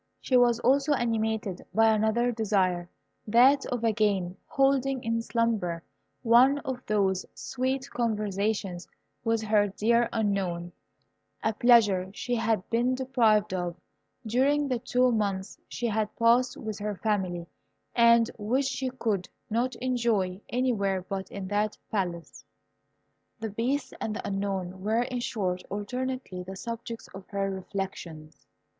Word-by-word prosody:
She 260 - 0
was 240 -2 +5
also 280 +3 +3
animated 220 -5 -1
by 225 0 +5
another 220 +3 +2
desire, 190 -6 0 0.4
that 255 +6 +5
of 245 -2 -3
again 205 -5 +1
holding 270 -1 +1
in 230 0 0
slumber 220 -8 -1 0.4
one 250 +4 +6
of 255 -1 -4
those 195 -3 +1
sweet 260 +1 -2
conversations 210 -5 -1 0.4
with 225 -1 +1
her 210 -1 +3
dear 235 +4 +2
Unknown, 190 -6 -1 0.7
a 220 - +1
pleasure 210 -6 +4
she 245 - -3
had 225 -4 0
been 240 +2 +2
deprived 230 -6 +2
of 175 -2 -2 0.5
during 275 +6 +2
the 255 -3 -1
two 250 +1 +2
months 200 -4 -2
she 240 - -4
had 215 -2 0
passed 235 +2 +3
with 215 -2 -5
her 210 0 -3
family, 185 -5 -1 0.5
and 235 -1 +5
which 250 +7 +1
she 260 0 -2
could 220 -7 -2 0.2
not 240 +3 0
enjoy 230 -7 0
anywhere 200 -7 0
but 190 -1 -4
in 195 -2 -6
that 210 +1 0
Palace. 175 -6 -3 1.0
The 220 -1 -4
Beast 250 +7 -1
and 215 - -2
the - - -5
Unknown 195 -2 -3
were, 220 +4 +1
in 250 0 -3
short, 185 -6 -2
alternately 250 -1 -4
the 190 +2 -8
subjects 230 +2 -6
of 195 -1 -10
her 195 -1 -2
reflections. 185 -5 -6
220 Hz, 135 wpm, -28 LUFS, 195-245 Hz, 1.0 s, one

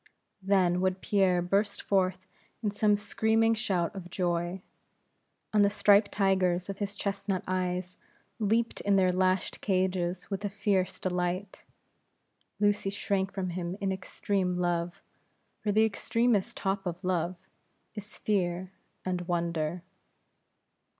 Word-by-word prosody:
Then 185 -2 +3
would 185 0 +1
Pierre 185 -4 +2
burst 200 +3 +1
forth 185 -1 +1 0.4
in 210 - +1
some 210 0 +3
screaming 225 +2 +2
shout 185 -6 -1
of 180 -2 -7
joy; 175 +1 -1 0.9
and 210 -1 +5
the 200 - +5
striped 205 0 +4
tigers 190 -2 +1
of 195 - -9
his 205 0 -3
chestnut 195 -1 -2
eyes 180 -1 -2 0.4
leaped 225 +2 +1
in 200 -1 +2
their 185 -1 +4
lashed 185 +1 0
cages 185 -1 0
with 195 +1 -3
a 205 - -1
fierce 195 -2 0
delight. 180 +1 -2 0.9
Lucy 205 -1 +2
shrank 195 -1 -1
from 185 -2 -3
him 175 +1 -4
in 195 -1 0
extreme 190 -1 -1
love; 175 -1 -1 0.6
for 210 - -1
the 215 +2 +5
extremest 220 -1 +1
top 195 0 -1
of 175 +2 -5
love, 180 -1 0 0.6
is 210 -1 -8
Fear 185 -3 -1 0.3
and 180 -1 -1
Wonder. 170 -1 -1
190 Hz, 130 wpm, -29 LUFS, 180-205 Hz, 0.9 s, and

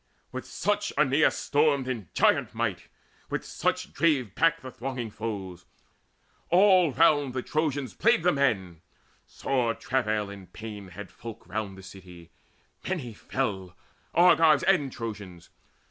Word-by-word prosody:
With - - -6
such 205 0 -1
Aeneas 150 +1 +3
stormed 145 -3 +1
in 115 -10 -4
giant - - +2
might, - - -2 0.4
With - - -3
such - - -2
drave 135 - +1
back 165 0 +2
the 130 - -8
thronging 120 -2 -5
foes. 95 -5 -6 0.8
All 185 -3 +5
round 145 -3 +3
The 130 - -2
Trojans 145 -5 -1
played 230 -7 +3
the 180 - +4
men. 100 - 0 0.5
Sore 125 -4 -1
travail 110 -5 -1
and 100 -3 -12
pain 105 -3 -8
Had 95 +2 -9
all 115 -2 -9
folk - - -26
round 100 0 -4
the 95 - -12
city: 90 -3 -13 0.6
many 145 -11 -3
fell, 95 -6 -3 0.4
Argives 165 -4 +5
and 140 -2 +2
Trojans. 105 -8 -8
125 Hz, 135 wpm, -27 LUFS, 100-150 Hz, 0.8 s, All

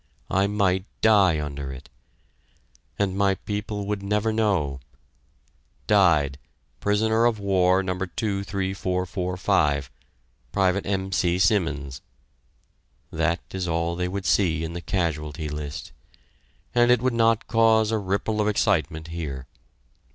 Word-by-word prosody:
I 95 +1 +2
might 100 -2 +1 0.2
die 100 -7 +5
under 70 -2 -5
it! 65 +2 -10 1.1
And 100 -2 0
my 100 -1 +2
people 105 +1 -4
would 105 0 -2
never 105 +2 0
know 95 -12 0 1.1
"Died 80 -9 +3 0.4
Prisoner 110 - +2
of 120 -2 +2
War 95 -2 +2
No. 95 -1 -1
23445, 95 - -1 0.6
Pte. 95 0 +2
M. 95 -1 -2
C. 90 -1 +1
Simmons" 80 -9 0 1.1
that 85 +1 0
is 95 -1 -3
all 85 0 -1
they 90 +1 -1
would 95 +1 -4
see 80 -5 +2
in 80 +1 -4
the 85 - -5
casualty 75 -4 -2
list, 75 0 -6 0.8
and 120 0 +4
it 125 -1 +4
would 130 -1 +1
not 115 -1 +2
cause 110 -1 +3
a 110 - +1
ripple 100 +2 -1
of 105 - +1
excitement 80 -6 0
here. 75 -6 -5
95 Hz, 120 wpm, -24 LUFS, 80-105 Hz, 1.1 s, die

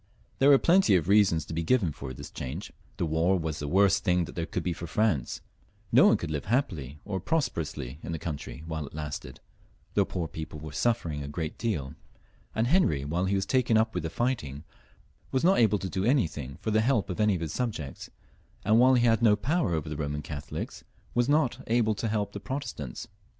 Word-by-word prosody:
There 135 - +6
were 140 - +8
plenty 175 - +4
of 85 -3 +1
reasons 100 -6 +4
to - - -7
be 80 - -1
given 90 -1 +2
for 70 -2 -7
his 65 - -9
change. 80 +11 -6 0.2
The - - 0
war 80 +4 +2
was 80 -3 -3
the 75 - -4
worst 95 +4 +3
thing 90 -3 +2
there 85 +1 -5
could - - -3
be 90 - -1
for 85 - -7
France; 95 - 0 0.5
no - - +7
one - - +5
could - - -5
live 75 -2 -3
happily 85 - -1
or 95 -2 -2
prosperously 80 - -2
in - - -6
the 80 - -2
country 75 -1 -6
while 80 -3 -4
it 70 - -12
lasted; 75 -1 -6 0.5
the - - +4
poor 85 -3 -3
people 80 0 -7
were 80 0 -8
suffering 85 -5 0
a 70 - -5
great 75 +2 -4
deal, 80 - -2 0.6
and 110 - +2
Henry, 120 - +2
while 85 +5 0
he 100 +1 +1
was 95 0 0
taken 120 0 +2
up 110 0 +2
with 80 -3 -3
fighting, 80 - -2 0.7
was 130 - 0
not 190 +3 +5
able 110 -3 +4
to 95 - -4
do 95 0 -2
anything 80 - 0
for 110 - -1
the 110 +1 +3
help 115 -5 +1
of 90 - -5
any 105 -2 +3
of 85 - -4
his 80 -2 -3
subjects, 90 - -4 0.6
and, 110 +2 +5
while 130 +1 +6
he 120 -1 +3
had 115 -1 +3
no 110 -3 +6
power 125 - 0
over 80 -1 -3
the 75 - -4
Boman 75 0 -3
Catholics, 75 -2 -6 0.3
was 120 +2 +2
not 145 -5 +2
able 115 -1 +2
to 110 +2 -3
help 105 -2 -1
the 100 - -5
Protestants. 100 - -5
95 Hz, 215 wpm, -28 LUFS, 75-115 Hz, 0.7 s, were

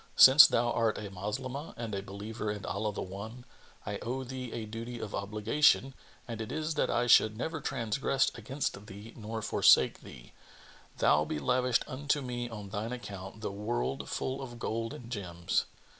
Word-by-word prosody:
Since 135 +3 +10
thou 120 0 +1
art 115 -2 +1
a 100 -2 -6
Moslemah 130 - -5
and 115 -2 -5
a 100 - -2
believer 105 +3 -5
in 105 0 -4
Allah 105 +3 -1
the - - -4
One, 110 +6 -8 0.4
I 100 -1 -3
owe 130 +3 -3
thee 130 -1 -6
a 115 -2 -4
duty 115 +3 -6
of 110 - -6
obligation 115 +7 +2 0.3
and 115 -2 -5
it 110 - -5
is 155 +1 -2
that 150 - 0
I 120 +1 +1
should 110 -2 +5
never 160 +5 -3
transgress 135 +1 0
against 120 -3 -4
thee 105 +4 -10
nor 110 0 -5
forsake - - +5
thee, - - -13 0.6
though 75 - +4
be - - -3
lavished 125 - +2
unto 145 +2 -1
me 120 -1 -4
on 105 -3 -8
thine 110 +4 -3
account 100 -3 -8
the 105 - -3
world 70 -9 -3
full 130 +1 -2
of 120 -3 -7
gold 115 0 -3
and 120 0 -11
gems. 85 -6 -1
115 Hz, 175 wpm, -31 LUFS, 100-125 Hz, 0.6 s, Since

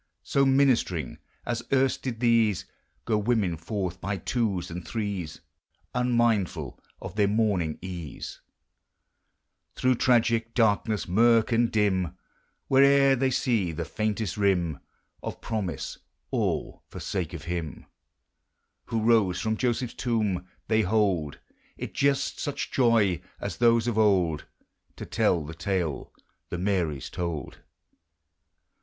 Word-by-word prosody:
So, 140 0 +2
ministering 125 - +2 0.3
as 120 -1 -2
erst 135 -1 +2
did 120 -3 -4
these, 115 -5 +3 0.4
(lo 110 -2 +2
women 105 -5 +1
forth 90 +1 -4
by 100 0 -2
twos 95 -4 -1
and 85 +1 -5
threes 100 -5 -4 0.5
(Unmindful 115 - +1 0.2
of - - -7
their 105 -1 +2
morning 100 -7 +1
ease), 85 -6 -7 1.3
Through 130 0 +3
tragic 115 -2 +2
darkness, 110 -2 +2
murk 115 +5 +4
and 115 0 +2
dim, 95 -5 +1 0.5
Where'er 140 0 +5
they 135 +1 +1
see 115 -8 +1
the 75 - -4
faintest 110 -3 -2
rim, 90 -7 +1 0.4
Of - - -6
promise, 95 -10 -4
— - - -49
all - - -1
for - - -9
sake 90 -4 -3
of 80 - -8
him 85 -4 -4 1.0
Who 115 -1 -2
rose 110 -6 +3
from 110 0 0
Joseph's 120 0 -1
tomb. 105 -7 -1 0.2
They 110 0 +3
hold 95 -8 +1 0.4
It - - -6
just 140 0 +1
such 145 - -3
joy 115 - +3 0.2
as - - -4
those 115 -1 +4
of 115 -2 0
old. 90 -8 +2 0.5
To - - -7
tell 85 -4 +1
the 80 - -7
tale 85 -3 -2 0.4
the 90 - -3
Marys 90 -7 -1
told. 85 -5 -4
105 Hz, 125 wpm, -27 LUFS, 90-115 Hz, 1.3 s, Where'er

